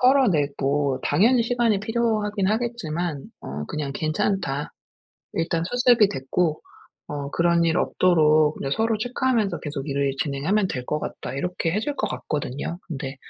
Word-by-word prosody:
털어내고 145 - +2
당연히 235 +4 +4
시간이 230 -4 +1
필요하긴 215 -3 0
하겠지만 175 - -2 0.2
어 70 +2 -5
그냥 145 -2 -3
"괜찮다. 155 -2 -1 0.6
일단 165 0 0
수습이 245 +1 +4
됐고 155 +2 -1 0.5
어 145 -1 -4
그런 170 +1 +3
일 165 0 +2
없도록 155 -4 +3
그냥 135 0 -3
서로 225 0 +1
체크하면서 240 -3 0
계속 145 -1 -5
일을 140 -1 0
진행하면 170 +8 0
될 125 -1 -4
것 150 - -1
같다." 130 - -6
이렇게 175 +3 -1
해 210 - +1
줄 290 +5 -2
것 - - -1
같거든요. 145 +3 -4
근데 135 -4 -5
170 Hz, 320 characters per minute, -24 LUFS, 145-215 Hz, 0.6 s, 당연히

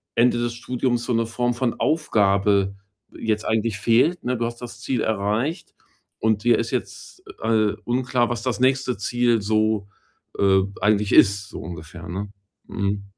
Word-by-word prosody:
Ende 120 +1 +4
des 120 0 -1
Studiums 120 0 -1
so 125 - -1
'ne 115 0 +1
Form 120 +2 -1
von 120 0 -1
Aufgabe 100 - +2 0.4
jetzt 110 -1 -1
eigentlich 110 -1 0
fehlt, 125 - +2
ne? 125 +1 0
Du 115 - -1
hast 120 +1 -6
das 120 -1 -9
Ziel 125 +1 -1
erreicht 110 - -1 0.5
und 110 -1 +1
dir 120 0 +4
ist - - -2
jetzt, - - -5 0.2
äh, 110 -2 +2
unklar, 125 0 +1
was 120 -1 -3
das 125 -5 -1
nächste 130 -1 +2
Ziel 120 +2 +1
so, 110 -1 +1 0.5
äh, 95 -1 +4 0.2
eigentlich 105 0 +2
ist, 100 0 +4
so - - -8
ungefähr, 80 0 -9
ne? 95 +4 -5 0.4
Mhm. 100 -1 -2
115 Hz, 160 wpm, -23 LUFS, 100-120 Hz, 0.5 s, Ende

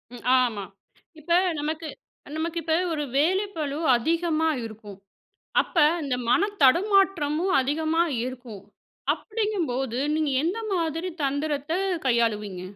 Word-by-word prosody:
ம் - - -12 0.2
ஆமா, 225 -5 -1 0.6
இப்ப 315 +3 -8 0.3
நமக்கு 310 +2 -3 0.5
நமக்கு 335 +1 -3
இப்ப 320 0 +1 0.2
ஒரு 295 -1 -2
வேலைப்பளு 325 -3 0 0.2
அதிகமா 320 +4 +1 0.2
இருக்கும். 210 -3 -10 0.7
அப்ப - - -16 0.3
இந்த 265 -3 -1
மன 405 - +3
தடுமாற்றமும் 365 +1 +3
அதிகமா 315 +5 +1 0.2
இருக்கும். 245 -6 -8 0.5
அப்டிங்கும்போது, 335 - -2 0.2
நீங்க 305 -3 0
எந்த 370 +7 -1 0.2
மாதிரி 330 +1 -1
தந்திரத்த 290 +2 -2 0.3
கையாளுவீங்க? 210 -6 0
310 Hz, 105 wpm, -25 LUFS, 255-340 Hz, 0.7 s, மன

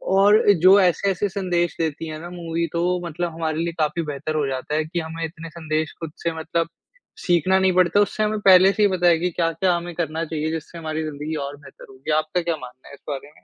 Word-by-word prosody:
और 205 +2 +6 0.2
जो 190 +3 +8
ऐसे-ऐसे 195 +2 +1
संदेश 175 -3 -1
देती 160 0 -2
है 155 0 -6
ना 175 - -8
मूवी 170 -1 -3
तो 175 +2 0
मतलब 170 +1 -3
हमारे 160 -1 -2
लिए 170 0 -2
काफ़ी 155 +2 0
बेहतर 150 +1 -4
हो 150 -2 +1
जाता 135 +2 -3
है 155 0 0
कि 170 +2 -3
हमें 165 0 -5
इतने 165 +1 -9
संदेश 155 -1 -3
खुद 165 -2 -6
से 170 - +1
मतलब 165 +1 -1 0.6
सीखना 180 +2 +3
नहीं 190 -1 +3
पड़ता 180 +2 +3
उससे 205 +1 0
हमें 215 0 0
पहले 190 0 +8
से 215 - +1
ही 205 - +5
पता 180 -2 +1
है 170 -1 +5
कि 180 +2 0
क्या-क्या 170 +2 +1
हमें 170 0 -5
करना 160 -1 -2
चाहिए 155 -1 -3
जिससे 160 +1 -6
हमारी 160 -1 -3
ज़िंदगी 155 +1 -5
और 140 - -8
बेहतर 145 - -14
होगी। 135 +3 -6
आपका 155 +3 0
क्या 170 -1 -1
मानना 130 -2 -12
है - - -13
इस - - -23
बारे 145 0 -6
में? - - -23
165 Hz, 230 wpm, -22 LUFS, 155-180 Hz, 0.6 s, जो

